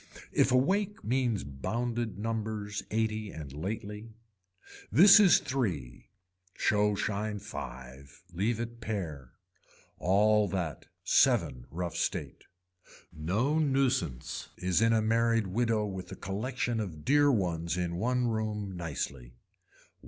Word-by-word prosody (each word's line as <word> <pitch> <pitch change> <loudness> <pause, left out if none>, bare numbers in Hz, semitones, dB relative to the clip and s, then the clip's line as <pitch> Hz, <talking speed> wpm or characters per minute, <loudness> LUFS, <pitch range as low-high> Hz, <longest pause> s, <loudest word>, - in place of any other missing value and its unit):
If - - +3
a 125 - +5
wake 195 - 0
means 120 -2 0
bounded 110 - -3
numbers 110 -1 -3
eighty 110 -1 -1
and 75 -6 -8
lately. 105 +6 -6 0.8
This 195 +6 +9
is 195 -4 +7
three, 85 - -3 0.5
show 105 0 +2
shine 105 +1 -2
five, 65 -5 -9
leave 105 +6 0
it 120 0 -6
pare. 80 - -5 0.7
All 105 +3 +3
that. 85 -6 -4 0.2
Seven - - +2
rough 85 +1 -4
state. - - -3 0.7
No 105 - 0
nuisance 130 - 0
is 90 +2 +1
in 115 0 +4
a 110 -1 +3
married 115 0 +2
widow 110 +2 0
with 95 -2 -6
a - - -5
collection 120 +4 -2
of 85 -8 -5
dear 145 +1 +5
ones 85 - -1
in 85 -1 -2
one 125 +5 +1
room 105 -3 -2
nicely. 70 -7 -5
105 Hz, 120 wpm, -30 LUFS, 85-115 Hz, 0.8 s, This